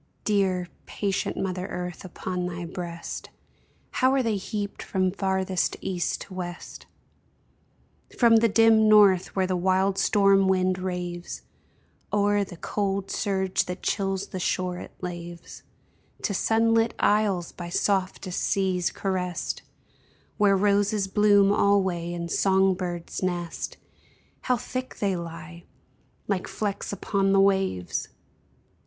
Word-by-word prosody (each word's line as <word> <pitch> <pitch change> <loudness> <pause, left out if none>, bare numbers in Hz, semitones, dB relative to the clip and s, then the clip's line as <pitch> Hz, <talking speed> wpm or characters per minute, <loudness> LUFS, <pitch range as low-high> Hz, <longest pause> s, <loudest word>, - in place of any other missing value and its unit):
Dear, 190 -4 +1 0.2
patient 200 -2 -2
mother 185 -1 -2
Earth, 180 0 -5
upon 180 -1 -4
thy 175 -1 -5
breast 170 -1 -6 0.6
How 260 0 +3
are 265 - +2
they 225 -3 0
heaped 205 +1 -4
from 185 -1 0
farthest 190 -1 -1
east 180 -2 -2
to 190 - -9
west! 175 -1 -7 1.3
From 230 -2 +6
the 230 0 +4
dim 220 0 +5
north, 200 -4 +5
where 190 -1 +2
the 185 0 -1
wild 190 +2 +1
storm 195 -2 +4
wind 185 -1 +2
raves 180 -1 -5 0.7
O'er 205 0 +2
the 175 -3 -9
cold 195 +1 -2
surge 190 -2 0
that 180 +1 -6
chills 195 -1 -1
the 185 - -5
shore 180 0 -1
it - - -8
laves, 175 -1 -7 0.6
To 200 - 0
sunlit 225 +2 +2
isles 205 -5 +2
by 175 -1 -7
softest 185 0 -1
seas 185 -3 +1
caressed, 180 -3 -3 0.8
Where 200 -1 +4
roses 205 0 +2
bloom 205 0 +4
alway 190 -4 +2
and 170 -1 -4
song 190 0 +3
birds 175 -2 -5
nest, 175 -2 -3 0.6
How 250 -1 +1
thick 255 +3 -5
they 200 -2 0
lie 170 0 -8 0.3
— - - -39
like 195 -3 -1
flecks 205 -2 -3
upon 195 -1 0
the 195 - +5
waves 190 - +1
190 Hz, 125 wpm, -26 LUFS, 180-200 Hz, 1.3 s, From